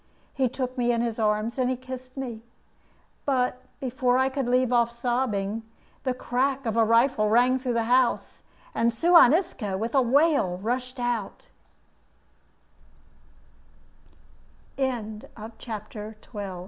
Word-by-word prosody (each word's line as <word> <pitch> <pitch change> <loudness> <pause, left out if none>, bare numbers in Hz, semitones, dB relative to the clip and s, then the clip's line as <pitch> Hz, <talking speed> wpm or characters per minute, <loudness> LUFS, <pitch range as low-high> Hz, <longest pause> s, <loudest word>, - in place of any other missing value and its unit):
He 265 -2 +1
took 255 0 -4
me 240 0 +2
in 235 -1 +1
his 235 -1 -2
arms 215 +3 0
and 255 0 0
kissed 255 0 -9
me; 240 -5 -5 0.8
but 255 -2 0 0.2
before 255 -1 +1
I 260 +1 +3
could 270 -2 -2
leave 250 0 +2
off 235 -1 +3
sobbing, 235 -4 -1 0.4
the 255 -2 -1
crack 260 +2 -1
of 225 -1 -1
a 230 - +4
rifle 230 0 +3
rang 250 +3 +4
through 250 -2 -2
the 230 - +1
house, 245 +1 +1 0.3
and 235 +1 +2
Suan 335 +2 +6
Isco, 285 - -1
with 225 +4 -3
a 270 - +5
wail, 265 - +3
rushed 250 +5 -3
o 240 -4 -1
245 Hz, 120 wpm, -26 LUFS, 230-260 Hz, 0.8 s, Suan